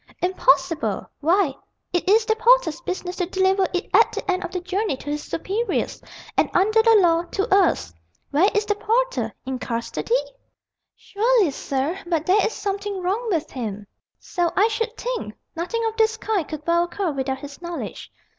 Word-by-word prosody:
"Impossible! 330 -3 +1
Why, 335 0 +2 0.4
it 355 +1 0
is 435 +2 +5
the 440 - +2
porter's 450 -8 +4
business 365 0 -4
to 360 - -1
deliver 380 +1 +2
it 360 +1 -2
at - - +6
the 385 - -2
end 370 +1 -1
of - - -4
the 365 - -3
journey 365 -3 -2
to 290 - -6
his 295 0 -2
superiors, 415 +8 -2 0.3
and - - +2
under 430 +4 +4
the 455 0 +5
law 340 -5 +4
to 395 +4 +1
us. 370 - +2 0.4
Where 330 +8 +4
is 420 0 +2
the 420 - +1
porter? - - 0
In 260 -1 -3
custody?" 235 - -1 0.8
"Surely, 430 -4 +2
sir, 280 +6 -2
but 330 -2 0
there 390 +3 +4
is - - +1
something 400 0 -3
wrong 430 +6 -1
with 330 -5 -1
him." 210 -5 -5 0.3
"So 350 -2 -1
I 420 +4 +4
should 455 +1 -2
think! - - -4 0.2
Nothing 455 +8 -2
of 445 0 -1
this 445 -1 +3
kind 420 -7 -1
could 305 -1 -7
well 340 0 +3
occur 355 0 -2
without 265 -1 -2
his 280 +3 -10
knowledge. 345 -1 -6
370 Hz, 175 wpm, -23 LUFS, 330-435 Hz, 0.8 s, at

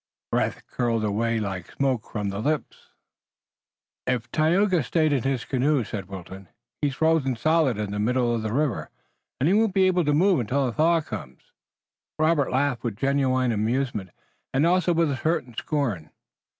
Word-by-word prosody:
Breath - - -1
curled 115 -3 -1
away 115 +2 0
like 95 -4 -5
smoke 130 -5 -1
from 105 -2 -2
the 100 +1 -4
lips. 150 +7 -2 1.2
"If 125 -2 -1
Tayoga 175 +3 +3
stayed 155 +2 +1
in 135 - +1
his 135 -1 -1
canoe," 135 0 +1
said 100 -3 -6
Wilton, 95 0 -9 0.3
"he's 140 -3 0
frozen 160 -3 +2
solidly 135 -4 +2
in 100 - -5
the 105 - -3
middle 120 +2 +1
of 115 - -1
the 110 -1 -3
river, 135 -2 -1 0.5
and 135 - +2
he 180 - +4
won't 215 -2 +2
be 190 -1 +5
able 180 -1 +3
to 150 - +2
move 180 0 +4
it - - +1
until 135 0 +1
a 120 - -3
thaw 165 +3 +3
comes." 65 - -9 0.7
Robert 155 -3 +2
laughed 130 -1 0
with 115 -4 -2
genuine 130 -1 +1
amusement 110 -2 -1 0.4
and 135 +4 +2
also 180 +1 +3
with 165 -3 +2
a 135 - -2
certain 155 -5 -1
scorn. 115 - -2
130 Hz, 175 wpm, -25 LUFS, 115-155 Hz, 1.2 s, be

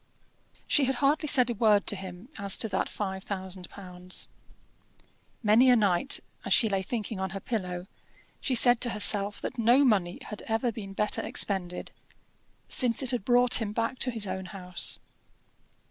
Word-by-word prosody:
She 285 - +3
had 265 +1 -1
hardly 290 +4 +1
said 250 -4 +5
a - - -1
word 215 -2 +3
to - - +1
him 190 +4 -9
as 200 -1 +3
to 225 - 0
that 190 -1 -1
five 190 -2 -5
thousand 190 -2 -6
pounds. 180 -1 -5 1.1
Many 225 +5 +5
a 250 - +6
night, 205 +3 +2 0.2
as - - +1
she 225 - +3
lay 195 -2 -1
thinking 215 0 -5
on 190 0 -2
her 195 +3 -6
pillow, 180 -5 -4 0.5
she 260 - -1
said 245 0 +5
to 245 - 0
herself 205 -1 +2
that - - -6
no 240 +5 +4
money 190 -7 +1
had 210 - -7
ever 225 +2 0
been 200 -3 -8
better 210 +1 0
expended, 180 -3 +1 0.8
since 245 0 +2
it 260 - -1
had 245 -6 -2
brought 245 +1 +4
him 210 -2 -3
back 230 +3 -2
to 255 - -1
his 225 -4 -2
own 190 -1 -5
house. 180 -2 -3
210 Hz, 175 wpm, -28 LUFS, 190-240 Hz, 1.1 s, a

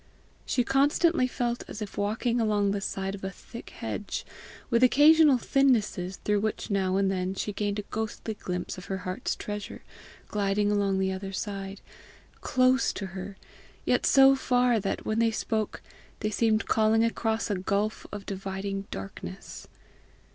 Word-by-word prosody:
She 245 - +2
constantly 280 +3 +3
felt 240 -1 -2
as - - -7
if 210 -2 -6
walking 230 +4 0
along 205 -2 +2
the 200 0 -2
side 195 0 -3
of 195 - -8
a 190 - -2
thick 230 +4 -11
hedge, - - -5 0.5
with 235 0 +3
occasional 295 +2 +6
thinnesses 220 -8 +1
through 210 -1 +2
which 215 0 -3
now 190 -1 +1
and 195 -1 +2
then 185 0 -2
she 210 - -3
gained 205 0 -1
a 210 - -3
ghostly 220 +1 -4
glimpse 180 -3 -4
of 185 - -11
her 195 - -3
heart's 185 0 -2
treasure 210 -1 -6 0.4
gliding 205 0 +1
along 200 -2 +1
the 190 0 +1
other 190 +1 -5
side 195 0 -5 0.6
close 255 0 +3
to 200 - -5
her, 190 +1 -7 0.5
yet - - +2
so 270 -1 +7
far 245 -3 +2
that, 195 -1 -3
when 220 +1 0
they 230 0 +4
spoke, 220 -1 -2 0.4
they 215 - -1
seemed 220 0 +2
calling 220 0 +3
across 225 -1 0
a - - +1
gulf 200 +3 -1
of 205 -1 -7
dividing 195 0 -4
darkness. 95 -2 -8
210 Hz, 160 wpm, -28 LUFS, 195-235 Hz, 0.6 s, so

